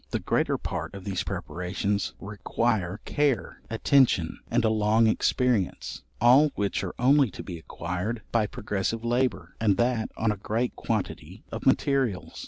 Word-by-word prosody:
The - - -1
greater - - +1
part - - -5
of 100 - -8
these 95 -2 -2
preparations 90 +5 -2
require 105 -1 -1
care, 140 -8 0
attention, 115 - +3
and 115 0 +2
a - - +4
long 110 +1 +3
experience; 110 -2 0 0.2
all 130 +6 +6
which 100 -1 -1
are 95 - -5
only 135 +1 +4
to - - -8
be 85 -3 -7
acquired 90 +8 -4
by 110 -3 +2
progressive 105 +3 -3
labour, 125 +2 0
and 100 -4 +3
that 120 -1 +1
on 110 -1 +1
a 105 - -4
great 115 +5 -2
quantity 110 -4 -4
of - - -4
materials. 135 -9 +1
110 Hz, 150 wpm, -27 LUFS, 100-120 Hz, 0.2 s, all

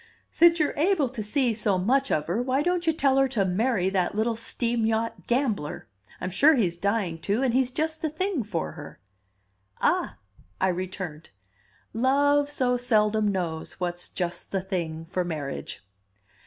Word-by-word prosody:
"Since 340 0 +5
you're 300 - +1
able 315 -4 +2
to 240 -3 -5
see 240 +3 +1
so 210 -3 +1
much 260 +9 +1
of 150 - +1
her, 185 +8 -1
why 260 +3 0
don't 355 0 0
you - - +6
tell 275 -4 +2
her 270 0 +4
to 230 -7 0
marry 195 +1 +1
that 185 0 0
little 225 +2 +1
steam 230 0 -2
yacht 225 +1 -2
gambler? 235 - -1 0.3
I'm 180 - -4
sure 295 - +5
he's 185 -9 +1
dying 195 -3 -1
to, 205 +9 0
and 250 -3 +1
he's 255 0 +2
just 315 +3 -1
the 315 - 0
thing 360 0 -1
for 80 - -3
her?" - - -11 0.8
"Ah," - - +1 0.4
I 190 - +2
returned, 180 -3 -5 0.6
"Love 285 +4 +3
so 250 -3 +1
seldom 215 -3 +2
knows 175 -5 -2
what's 175 -1 -3
just 175 -2 -3
the 195 - 0
thing 165 -4 -3
for 180 +2 -2
marriage." 150 - -5
225 Hz, 170 wpm, -26 LUFS, 185-270 Hz, 0.8 s, you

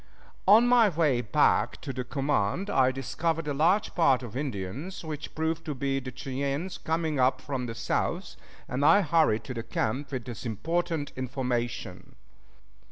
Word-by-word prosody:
On 220 +5 +7
my 240 -3 +6
way 150 -8 +2
back 115 - +2
to 135 - -5
the 130 - -3
command 140 - -1
I 130 -1 +4
discovered 150 +5 -2
a 145 - 0
large 170 +9 +2
party 135 -7 +3
of 115 -1 -10
Indians, 135 - -4
which 155 -2 -6
proved 160 +1 -1
to 150 - -3
be 135 +1 -1
the 130 -1 -7
Cheyennes, 140 +6 -3
coming 160 -3 -1
up 130 0 +3
from 130 -2 -4
the 115 - -5
south, - - -2 0.3
and 130 +3 -2
I 165 +7 +6
hurried 155 - +2
to 130 - -6
the 115 - -4
camp 130 +5 -2
with 130 -4 -4
this 120 -3 -7
important 155 - -2
information. 120 -6 -3
140 Hz, 165 wpm, -28 LUFS, 125-160 Hz, 0.3 s, On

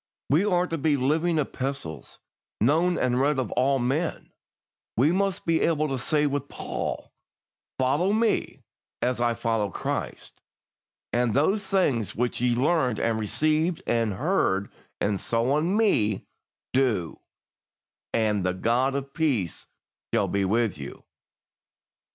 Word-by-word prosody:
We 155 +7 +4
are 180 -3 +2
to 165 -2 -4
be 150 0 +2
"living 160 +6 +1
epistles, 135 - -4 0.4
known 165 +9 +3
and 125 0 +1
read 145 +1 +2
of 130 -4 -2
all 135 +2 +2
men"; 135 +7 -2 0.7
we 140 +7 +4
must 195 +1 0
be 165 -1 +2
able 155 -2 +2
to 135 -1 -2
say 150 +3 +1
with 145 -1 -2
Paul, - - -5 0.6
"follow 145 +9 +2
me 220 +1 0 0.4
as 125 -1 0
I 120 -1 +2
follow 115 -3 0
Christ"; - - -5 0.7
and 120 -2 +1
"those 195 +8 +2
things 125 - +1
which 120 0 -1
ye 125 -1 +2
learned 130 -3 +2
and 115 -1 0
received 155 - 0
and 115 -3 +1
heard 100 - 0 0.3
and 100 -1 0
saw 120 +4 0
in 175 +6 0
me, 110 - +2 0.5
do; 115 -11 +1 0.9
and 105 -3 +1
the 90 0 0
God 125 +7 +1
of 140 0 -4
peace 125 - -1 0.4
shall - - +2
be 100 -1 0
with 110 -3 0
you." 70 - -8
130 Hz, 135 wpm, -26 LUFS, 115-160 Hz, 0.9 s, We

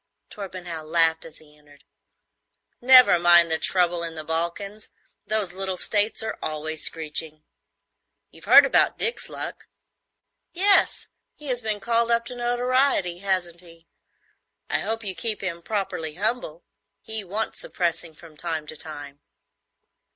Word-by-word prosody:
Torpenhow 180 -5 -7
laughed 160 0 +1
as 165 - -12
he 150 -1 -20
entered. 145 -1 -22 1.0
"Never 255 -7 +8
mind 170 -1 +5
the 160 - +1
trouble 175 -2 +2
in 165 -1 -4
the 155 - -6
Balkans. 170 +6 -4 0.4
Those 210 -4 -1
little 190 0 -1
states 210 +3 0
are 220 - -5
always 155 0 -4
screeching. 155 -1 -1 0.9
You've - - -15
heard - - +8
about - - +2
Dick's 465 +2 -2
luck?" - - -6 0.9
"Yes; 390 +2 +3 0.3
he 300 -2 -10
has 245 -1 -1
been 215 -2 -2
called 235 +2 +1
up 235 0 +1
to 250 - -7
notoriety, 245 -6 0
hasn't 185 -3 -2
he? 165 -1 -18 0.9
I - - +1
hope 225 +1 -3
you 195 -2 -3
keep 220 +3 -2
him 170 -3 -4
properly 170 -6 -4
humble. 190 -4 -3 0.4
He 220 -1 -4
wants 205 +4 -4
suppressing 170 -2 -3
from 160 -1 -16
time 160 -1 -3
to 155 - -9
time." 145 -2 -9
175 Hz, 140 wpm, -24 LUFS, 160-220 Hz, 1.0 s, Never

